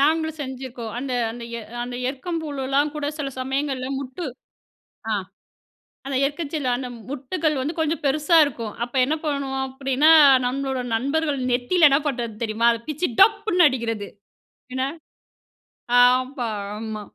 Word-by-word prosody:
நாங்களும் 315 +2 +2
செஞ்சுருக்கோம். 255 -4 -6
அந்த 260 0 -4 0.2
அந்த 235 +1 -8 0.2
எ - - -6 0.2
அந்த 245 0 -6
எருக்கம்பூவுலலாம் 285 -1 -1
கூட, 300 -1 -3
சில 280 -2 -2
சமயங்கள்ல 265 0 -2
முட்டு 275 +6 -6 0.9
ஆ - - +2 0.9
அந்த 275 - -2
எருக்கஞ்செடில 290 -1 -3
அந்த 250 0 -5 0.2
முட்டுகள் 295 +2 -1
வந்து 290 +6 -2
கொஞ்சம் 320 +1 0
பெருசா 305 +4 +3
இருக்கும். 235 -6 -5
அப்ப 240 - -13
என்ன 290 +5 0
பண்ணுவோம் 275 -3 -1
அப்டின்னா, 270 +3 +2 0.4
நம்மளோட 265 0 -2
நண்பர்கள் 280 +5 0
நெத்தியில 295 +7 +4
என்ன 275 - +5
பண்றது 240 -5 -2
தெரியுமா? 225 +1 +2
அத 230 - -4
பிச்சு 305 +4 -1
டப்புன்னு 405 -4 +5
அடிக்கிறது. 230 -6 -3 0.7
என்ன 260 0 0 1.2
ஆமா 255 0 +3 0.3
ஆமா. 220 -1 -5
270 Hz, 130 wpm, -23 LUFS, 250-300 Hz, 1.2 s, என்ன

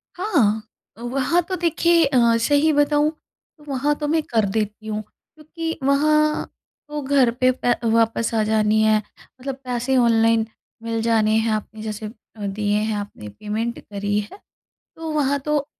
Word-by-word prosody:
हाँ, 400 +5 -4
हाँ। 215 0 +1 0.3
अ, - - -13
वहाँ 265 +8 +1
तो 370 - -1
देखिए 335 -1 +3
अ, 270 -2 +1 0.2
सही 290 +5 +3
बताऊँ 290 +1 +3 0.5
तो 300 - -19
वहाँ 280 +2 0
तो 295 0 -3
मैं 320 +2 +2
कर 225 -6 +1
देती 215 +1 -3
हूँ 215 0 -2
क्योंकि 315 +8 -8
वहाँ 305 +2 +2 0.4
तो 295 0 -4
घर 265 -3 +3
पे 255 0 +5
प 245 - +5 0.2
वापस 230 0 +1
आ 220 - +2
जानी 215 0 +2
है 215 0 +4 0.4
मतलब 270 0 -4
पैसे 250 +1 -1
ऑनलाइन 230 -2 +3 0.4
मिल 230 0 -2
जाने 220 -1 +2
हैं 225 0 +1
आपने 215 0 -5
जैसे 215 0 -5
अ, 210 -1 -10
दिए 205 +1 0
हैं 215 0 -1
आपने 205 - -7
पेमेंट 215 - -4
करी 205 0 -2
है, 210 - -8 0.6
तो 325 -1 -5
वहाँ 285 -2 +1
तो 295 0 -1
235 Hz, 165 wpm, -22 LUFS, 215-295 Hz, 0.6 s, पे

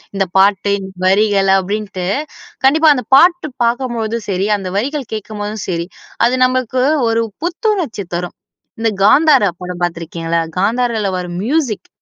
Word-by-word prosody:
இந்த 195 0 +1
பாட்டு 200 +1 +3 0.3
வரிகள் 195 0 +3
அப்படின்டு 200 -1 -4 0.6
கண்டிப்பா 310 +4 +5
அந்த 250 - -3
பாட்டு 340 +2 +4 0.2
பாக்கும்போதும் 235 -2 -1
சரி, 195 0 0
அந்த 195 - -6
வரிகள் 275 +4 -3
கேட்கும்போதும் 210 -1 -5
சரி, 170 -1 -2 0.4
அது 245 +2 +2
நமக்கு 255 0 0 0.3
ஒரு 225 0 +1 0.2
புத்துணர்ச்சி 350 - -1
தரும். 175 0 -4 0.4
இந்த 225 0 +1
காந்தாரா 275 - +5
படம் 180 0 -6
பாத்துருக்கிங்களா? 165 -1 -2 0.2
காந்தாரல 225 0 0
வரும் 180 -1 -5
மியூசிக். 265 -6 -1
215 Hz, 125 wpm, -16 LUFS, 190-255 Hz, 0.6 s, கண்டிப்பா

